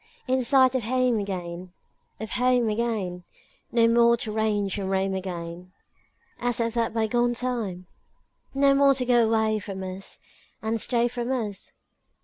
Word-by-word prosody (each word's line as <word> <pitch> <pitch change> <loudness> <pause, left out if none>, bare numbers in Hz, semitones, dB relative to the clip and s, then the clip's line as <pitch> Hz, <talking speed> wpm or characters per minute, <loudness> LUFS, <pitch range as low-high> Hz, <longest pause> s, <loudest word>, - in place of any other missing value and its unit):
In 260 0 +1
sight 260 0 +5
of 260 - 0
home 250 -1 +1
again, 180 -2 -5 0.5
Of 220 0 -6
home 250 -2 +2
again; 210 -5 -2 0.5
No 230 -1 +4
more 235 0 +4
to 220 -2 -4
range 210 -2 0
and 190 -1 -3
roam 195 0 0
again 180 -1 -6 0.7
As 245 -1 -1
at 230 -1 0
that 230 -1 0
bygone 240 +2 +1
time? 230 -8 -3 0.7
No 275 0 +4
more 275 0 +5
to 255 -1 -1
go 240 -1 +4
away 220 -1 +1
from 195 -2 -7
us 185 +1 -7 0.4
And 220 0 -2
stay 240 -1 +2
from 245 +1 -4
us? 215 -6 -4
225 Hz, 150 wpm, -25 LUFS, 195-245 Hz, 0.7 s, sight